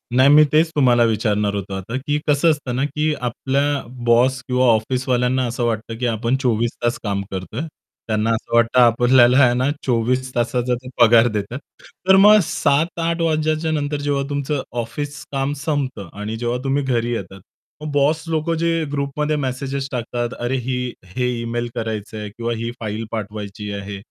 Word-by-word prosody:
नाही 130 +2 +6
मी 150 +1 +8
तेच 160 +2 +4
तुम्हाला 125 -4 +4
विचारणार 105 -2 +1
होतो 100 -1 -5
आता 95 +5 -5
की 145 0 +1
कसं 150 +3 +3
असतं 135 -5 -3
ना, 130 - 0
की 150 +1 -1
आपल्या 135 +3 0 0.2
बॉस 125 +3 +3
किंवा 125 0 +2
ऑफिसवाल्यांना 125 +2 +1
असं 120 +1 -3
वाटतं 115 0 -3
की 125 - -1
आपण 115 +2 0
24 115 -1 +1
तास 120 0 0
काम 100 -2 -1
करतोय. 95 +7 -5 0.5
त्यांना 110 0 0
असं 115 +1 -1
वाटतं 115 +2 +4
आपल्याला 120 +1 +5
आहे 120 -1 +4
ना 130 +2 +1 0.2
24 130 +1 0
तासाचा 125 +1 0
ते 130 - -12
पगार 115 0 +7
देतात. 105 +4 -3 0.5
तर 190 - +7
मग 210 +2 +8
7:00-08:00 165 +4 0
वाजल्याच्या 155 0 0
नंतर 145 -1 -1
जेव्हा 145 -1 0
तुमचं 145 0 -2 0.2
ऑफिस 145 +6 -6
काम 135 +1 -1
संपतं 135 - -2
आणि 110 +2 -4
जेव्हा 120 +1 -1
तुम्ही 140 +1 0
घरी 120 -2 0
येतात, 95 -3 -6 0.4
मग 155 - -5
बॉस 145 +3 +2
लोक 160 0 -1
जे 165 -1 +1
ग्रुपमध्ये 145 +2 -1
मेसेजेस 135 0 -3
टाकतात, 120 -1 -3
"अरे 120 +2 -1
ही 130 -1 -1 0.4
हे 125 -1 0
ईमेल 120 +1 -3
करायचे 110 -1 -4
आहेत. 105 -1 -6
किंवा 120 0 -2
ही 115 +1 -3
फाइल 110 0 -4
पाठवायची 105 -1 -5
आहे, 100 0 -7
125 Hz, 170 wpm, -20 LUFS, 115-145 Hz, 0.5 s, मी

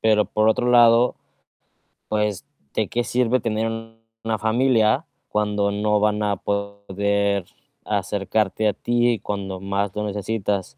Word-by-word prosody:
Pero 105 -1 +3
por 110 +3 +1
otro 120 +2 +2
lado, 120 0 +5 0.9
pues 105 -3 -1 0.3
¿de 110 -3 0
qué 120 0 -1
sirve 125 +1 +1
tener 110 0 -1 0.6
una 110 -1 -1
familia 115 +4 +2 0.2
cuando 105 -1 0
no 105 +1 +1
van 105 0 +1
a 100 -1 +1
poder 100 -1 -1 0.4
acercarte 105 +1 0
a 105 - +2
ti 120 +1 +1
cuando 95 -2 -4
más 100 0 -1
lo 105 - -2
necesitas? 100 -6 -3
105 Hz, 130 wpm, -22 LUFS, 100-110 Hz, 0.9 s, lado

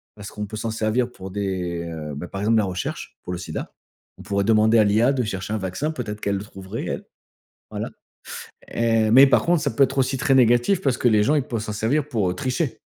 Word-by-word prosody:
parce 105 -1 -9
qu'on 105 -1 -5
peut 110 +1 -7
s'en 115 +1 -3
servir 115 +3 0
pour 95 -4 -9
des, 90 -4 -3
heu, 75 -3 -6
bah, 75 +5 -6
par 95 +3 -6
exemple 110 +2 +3
la 105 - +3
recherche, 90 -2 -5
pour 90 - -5
le 90 - -4
sida. 80 -3 -6 0.5
On - - -11
pourrait 100 0 0
demander 110 +1 +4
à - - +6
l'IA 110 +6 +3
de 130 -2 0
chercher 95 -2 -4
un - - 0
vaccin. 95 - -2
Peut-être 105 -8 -5
qu'elle 100 - 0
le 95 - -5
trouverait, 95 -2 -7
elle. - - -4 0.7
Voilà - - -4 0.8
et 115 -2 +1
mais 135 +5 +8
par 135 - +3
contre, 170 -3 +2
ça 145 - 0
peut 140 - +4
être 135 +1 -4
aussi 135 0 +1
très 135 +1 +2
négatif, 120 - +4
parce 135 -4 +1
que 125 - +3
les 105 -2 +4
gens, 130 +9 +2
ils 145 - +2
peuvent 115 -4 -3
s'en 105 - -4
servir 130 +8 0
pour, 110 -9 0
heu, - - -3
tricher. 130 - -2
110 Hz, 240 wpm, -23 LUFS, 100-125 Hz, 0.8 s, mais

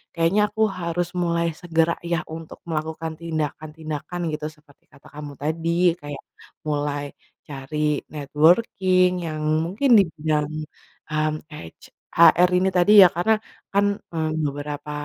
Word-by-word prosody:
kayaknya 170 +5 +2
aku 220 - -5 0.2
harus 170 0 -2 0.2
mulai 170 0 0
segera 165 0 0
ya 170 0 -2
untuk 160 0 -9
melakukan 160 +1 -3
tindakan-tindakan 155 0 -5
gitu 150 0 -4
seperti 150 -2 -25
kata - - -19
kamu 150 -1 -8
tadi. 160 +3 -2 0.3
Kayak 145 -1 -8 0.4
mulai 145 -1 -1 0.4
cari 150 +1 -2
networking 180 +5 +3 0.2
yang 155 -1 -4 0.2
mungkin 210 +11 -1
di - - +6
bidang, 150 -1 0 0.6
mmm, 155 0 0
h 155 - -35
ech 85 - -12 0.3
HR 170 +2 +7
ini 190 +1 +2
tadi 180 +2 +3
ya - - +8
karena 200 +6 +2 0.3
kan, 200 +1 +2 0.3
eee, 160 -1 -1 0.2
beberapa 145 +1 -5
160 Hz, 130 wpm, -23 LUFS, 150-170 Hz, 0.6 s, ya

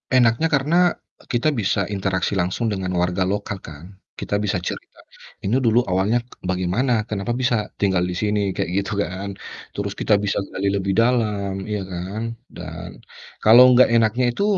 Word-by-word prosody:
Enaknya 120 +5 +4
karena 145 +4 +1 0.6
kita 120 +5 +2
bisa 100 0 0
interaksi 95 -1 -1
langsung 100 +6 -1
dengan 95 -2 -2
warga 90 +1 +1
lokal 100 0 -2
kan, 75 0 -11 0.3
kita 100 - -1
bisa 105 -2 0
cerita, - - -6 0.4
"Ini 120 +7 +1
dulu 120 -1 +3
awalnya 105 +6 +1 0.3
bagaimana? 105 +6 +1
Kenapa 105 +3 -2
bisa 125 -1 +1 0.3
tinggal 95 -3 +2
disini?" 105 +4 -1 0.2
Kayak - - -2
gitu 100 +1 -4
kan. 95 +2 -5 0.5
Terus 100 0 -3
kita 105 - +3
bisa 100 - 0
gali 100 +1 -2
lebih 100 -1 -1
dalam, 110 -4 +1
iya 105 -2 -2
kan, 95 +5 -5 0.3
dan - - -8 0.5
kalau 115 +4 +9
gak 130 - +6
enaknya 115 +2 +3
itu 200 - -2
105 Hz, 150 wpm, -22 LUFS, 95-120 Hz, 0.6 s, kalau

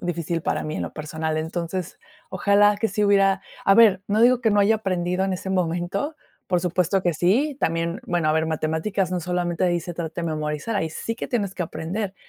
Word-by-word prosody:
difícil 170 -1 -2
para - - -1
mí 155 0 -4
en - - -2
lo - - -5
personal. 155 0 -3
Entonces, 170 +2 -4 0.3
ojalá 200 +2 +4
que 225 - 0
sí 205 +2 0
hubiera 195 -1 +3 0.2
a 195 - +5
ver, 205 -5 +6
no 210 +2 +1
digo 250 0 +5
que 225 - +2
no 205 - +4
haya 220 +2 +4
aprendido 185 -2 -1
en 190 - -1
ese 185 +1 -4
momento, 185 - -1 0.3
por 180 -2 +1
supuesto 180 +1 +1
que 175 - +1
sí. 255 - +2
También 165 +2 -1
bueno, 170 -3 0
a - - +3
ver 160 0 +1
matemáticas, 160 +5 -1
no 180 - -1
solamente 175 0 -1
ahí 175 -1 +1
se 175 -1 -7
trata 165 0 -4
de - - -2
memorizar, 155 +7 -2
ahí 160 - 0
sí 230 +7 -4
que - - -4
tienes 200 -6 -1
que 180 - -1
aprender. 190 +6 -4
180 Hz, 215 wpm, -23 LUFS, 165-200 Hz, 0.3 s, ver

